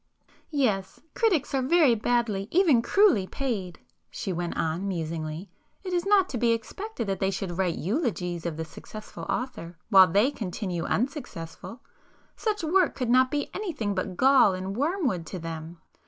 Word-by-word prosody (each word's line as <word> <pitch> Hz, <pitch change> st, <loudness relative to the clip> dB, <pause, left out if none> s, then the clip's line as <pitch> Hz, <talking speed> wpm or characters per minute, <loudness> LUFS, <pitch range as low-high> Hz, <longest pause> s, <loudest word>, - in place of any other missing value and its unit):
"Yes,—critics 285 Hz, -, 0 dB
are 270 Hz, -, +2 dB
very 290 Hz, -1 st, +4 dB
badly, 225 Hz, -3 st, 0 dB
even 325 Hz, -9 st, +4 dB
cruelly 365 Hz, -, +4 dB
paid,"—she 195 Hz, -, -5 dB
went 175 Hz, 0 st, -3 dB
on 165 Hz, +5 st, -1 dB
musingly—"It 165 Hz, -, -6 dB
is 350 Hz, +2 st, 0 dB
not 395 Hz, -2 st, +5 dB
to 245 Hz, -, -3 dB
be 235 Hz, 0 st, +3 dB
expected 240 Hz, -, -5 dB
that 195 Hz, -1 st, -2 dB
they 190 Hz, -, +1 dB
should 190 Hz, -2 st, -3 dB
write 180 Hz, -3 st, +1 dB
eulogies 180 Hz, -, -2 dB
of 160 Hz, -2 st, -4 dB
the 160 Hz, -, -3 dB
successful 215 Hz, +6 st, -10 dB
author, 180 Hz, -10 st, -4 dB
while 190 Hz, -3 st, +8 dB
they 205 Hz, -, +3 dB
continue 180 Hz, -6 st, -4 dB
unsuccessful,—such 260 Hz, -, -5 dB
work 355 Hz, +2 st, +2 dB
could 250 Hz, -3 st, -1 dB
not 255 Hz, +1 st, +5 dB
be 290 Hz, +1 st, -2 dB
anything 310 Hz, -, -2 dB
but 185 Hz, -1 st, -3 dB
gall 260 Hz, -7 st, +5 dB
and 190 Hz, +1 st, -4 dB
wormwood 280 Hz, -, 0 dB
to 185 Hz, -, -5 dB
them. 165 Hz, 0 st, -7 dB
220 Hz, 145 wpm, -27 LUFS, 180-285 Hz, -, while